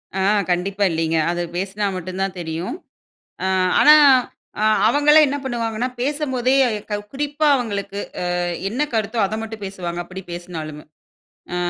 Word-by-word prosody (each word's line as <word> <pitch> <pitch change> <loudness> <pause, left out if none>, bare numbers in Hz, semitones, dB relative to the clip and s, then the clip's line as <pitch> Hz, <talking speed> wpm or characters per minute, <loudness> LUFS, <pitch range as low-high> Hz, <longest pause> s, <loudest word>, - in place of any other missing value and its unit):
அ - - -1 0.3
கண்டிப்பா 195 +3 0
இல்லைங்க. 165 0 0
அது 175 - -2 0.2
பேசினா 200 +3 -2
மட்டும்தான் 185 +2 -3
தெரியும். 165 - -4 0.7
அ - - +1 0.3
ஆனா 300 - +8 0.7
அ - - 0 0.3
அவங்களே 295 +5 +5
என்ன 280 - -2
பண்ணுவாங்கன்னா 235 -1 -2
பேசும் 290 +2 -1
போதே 255 +1 +2 0.6
குறிப்பா 295 +2 -1
அவங்களுக்கு 200 -4 -4 0.4
அ - - 0 0.3
என்ன 245 +8 -2
கருத்தோ 220 +1 -1
அத 205 - -5
மட்டும் 220 -2 -7
பேசுவாங்க, 180 -3 -5
அப்படிப் 185 0 -10
பேசினாலுமே. 160 -4 -7 0.7
அ - - -1
200 Hz, 135 wpm, -21 LUFS, 180-245 Hz, 0.7 s, ஆனா